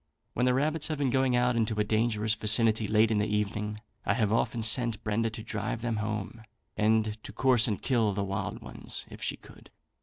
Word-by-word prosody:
When 125 +1 +1
the 125 - +3
rabbits 150 +3 +1
have 155 - -3
been 140 -3 0
going 130 -2 +2
out 125 0 +2
into 110 -2 0
a - - +3
dangerous 110 0 0
vicinity, 110 0 +2
late 110 +2 +3
in 105 - +2
the 105 - 0
evening, 105 0 -2 0.2
I 100 - +1
have 110 -4 +1
often 115 0 0
sent 115 0 +2
Brenda 115 +1 0
to 110 0 -8
drive 110 +1 -4
them 115 -2 -1
home, 105 +1 -4 0.3
and 110 0 +1
to - - -8
course 130 -3 +3
and 105 -5 -1
kill 115 -6 +1
the 100 0 -2
wild 100 0 -4
ones - - -4
if - - -11
she - - -2
could. - - -17
110 Hz, 210 wpm, -29 LUFS, 105-120 Hz, 0.3 s, the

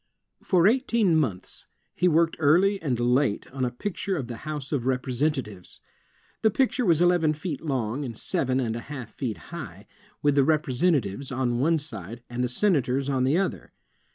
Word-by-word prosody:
For 180 -2 +3
eighteen 230 -5 +3
months, 110 - -2 0.3
he 180 - +1
worked 165 0 +3
early 180 +7 +3
and 130 -6 -1
late 125 -1 +1
on 130 0 -3
a 125 - +1
picture 190 - -3
of 135 - -3
the 120 -1 -7
House 150 0 -6
of 130 -5 -1
Representatives. 130 - -2 0.6
The 220 - +4
picture 250 +1 +1
was 165 -1 +4
eleven 175 -3 +3
feet 155 -1 -5
long 130 -3 -2
and 120 -5 -6
seven 130 0 -1
and 115 -3 -1
a - - -3
half 130 -7 -7
feet 120 -6 -3 0.2
high, 105 - -8 0.4
with 145 -1 +4
the 140 -1 +4
Representatives 140 - +1
on 125 -2 0
one 160 +5 +3
side, 115 - -6
and 120 +1 -2
the 125 - 0
Senators 135 - +1
on 130 -2 +1
the 140 +6 +2
other. 195 - -2
140 Hz, 175 wpm, -26 LUFS, 125-165 Hz, 0.6 s, The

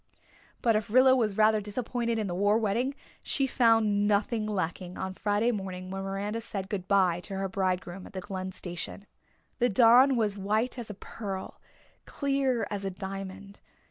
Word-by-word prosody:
But 230 -2 +4
if 215 +1 -1
Rilla 260 +3 +6
was 220 -5 0
rather 215 0 +4
disappointed 235 +2 -2
in 215 - -1
the 180 - -3
war 205 +4 +3
wedding 230 +5 0 0.3
she 275 - 0
found 225 -5 +3
nothing 210 +1 +1
lacking 185 -2 -3
on 190 - -4
Friday 210 +4 +1
morning 185 -3 -5
when 195 0 -4
Miranda 200 +3 -3
said 195 -4 -6
good 190 -3 -3
bye 185 -4 +3
to 195 +2 -7
her 195 0 -1
bridegroom 185 -1 -2
at - - -15
the 190 - -4
Glen 190 -2 -5
station. 180 +2 -6 0.5
The 245 0 +3
dawn 245 +5 +6
was 210 -4 0
white 215 +6 0
as 230 - -7
a 210 - -6
pearl, 195 -2 -7 0.4
clear 275 -4 0
as 200 -1 -3
a 195 - -1
diamond. 195 +1 -7
205 Hz, 175 wpm, -29 LUFS, 195-230 Hz, 0.5 s, Rilla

